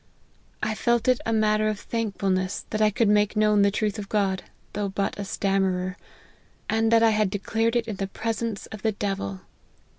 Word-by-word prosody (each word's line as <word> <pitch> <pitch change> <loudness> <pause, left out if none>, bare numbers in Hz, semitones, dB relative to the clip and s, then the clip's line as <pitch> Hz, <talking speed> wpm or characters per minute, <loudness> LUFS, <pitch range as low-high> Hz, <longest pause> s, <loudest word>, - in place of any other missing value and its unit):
I 220 - 0
felt 235 +1 +1
it 255 -1 +3
a - - +1
matter 215 -1 +2
of 215 -1 -1
thankfulness 195 -5 -2
that 215 - -1
I 215 - +5
could 225 +2 +1
make 210 0 +3
known 210 -1 +4
the 200 - +5
truth 210 +1 -1
of 200 - -7
God, 195 -3 +1 0.3
though 205 -1 -2
but 195 +1 -2
a - - -2
stammerer; 190 -2 0 0.7
and 225 0 +1
that 230 0 +5
I 225 - +6
had 215 -2 +2
declared 225 +4 0
it 235 -1 +1
in 215 -3 -4
the 195 - -2
presence 225 +1 -3
of 215 - -8
the 220 +1 +1
devil. 195 - -3
210 Hz, 190 wpm, -25 LUFS, 195-225 Hz, 0.7 s, I